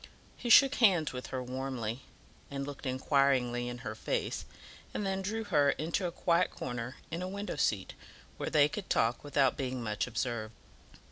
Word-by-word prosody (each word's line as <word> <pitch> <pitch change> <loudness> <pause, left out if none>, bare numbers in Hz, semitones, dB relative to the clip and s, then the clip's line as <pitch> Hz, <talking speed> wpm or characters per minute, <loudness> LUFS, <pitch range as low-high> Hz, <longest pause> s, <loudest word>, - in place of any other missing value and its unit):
He 240 - -5
shook 275 +4 +8
hands 180 - +4
with 125 0 -5
her 130 -1 -3
warmly, 125 -2 -4 0.5
and 140 0 -4
looked 145 -1 -6
inquiringly 130 -2 +2
in 120 - -5
her 110 - -3
face, 110 - -2 0.5
and 205 - -1
then 195 0 -1
drew 220 +4 -2
her 150 -9 +3
into 165 +6 0
a - - -4
quiet 170 0 +2
corner 120 0 -5 0.2
in 165 +2 -3
a 185 - -2
window 200 +2 -4
seat, 100 -3 0 0.4
where - - -3
they 145 -2 +5
could 190 +5 -6
talk 115 +2 +2
without 140 -2 +2
being 130 -3 -3
much 105 0 -1
observed. 115 -2 -3
135 Hz, 175 wpm, -32 LUFS, 125-175 Hz, 0.5 s, shook